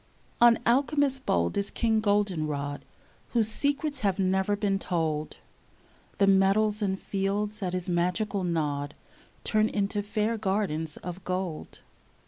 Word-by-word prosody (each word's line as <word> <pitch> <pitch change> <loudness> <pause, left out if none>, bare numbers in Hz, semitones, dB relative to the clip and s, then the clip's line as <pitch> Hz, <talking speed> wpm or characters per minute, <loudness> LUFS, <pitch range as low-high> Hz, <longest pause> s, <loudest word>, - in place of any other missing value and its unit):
On 240 -1 +7
alchemist 270 +2 +2
bold 85 0 +1
is 200 0 0
King 225 -2 +1
Goldenrod, 155 -9 0 0.6
•/■Whose 230 -2 +4
secrets 285 +4 -1
have 195 -3 +1
never 190 +1 +1
been 200 -1 0
told; 160 -5 -2 0.8
The 200 - +4
meadows 195 +2 +3
and 190 -2 0
fields 205 +2 -2
at 185 -2 -2
his 180 0 -2
magical 185 +3 0
nod 150 -4 -1 0.5
Turn 215 0 +2
into 205 0 -1
fair 215 +2 -1
gardens 190 -7 -1
of 180 +1 -7
gold. 180 -3 -4
195 Hz, 125 wpm, -28 LUFS, 175-215 Hz, 0.8 s, On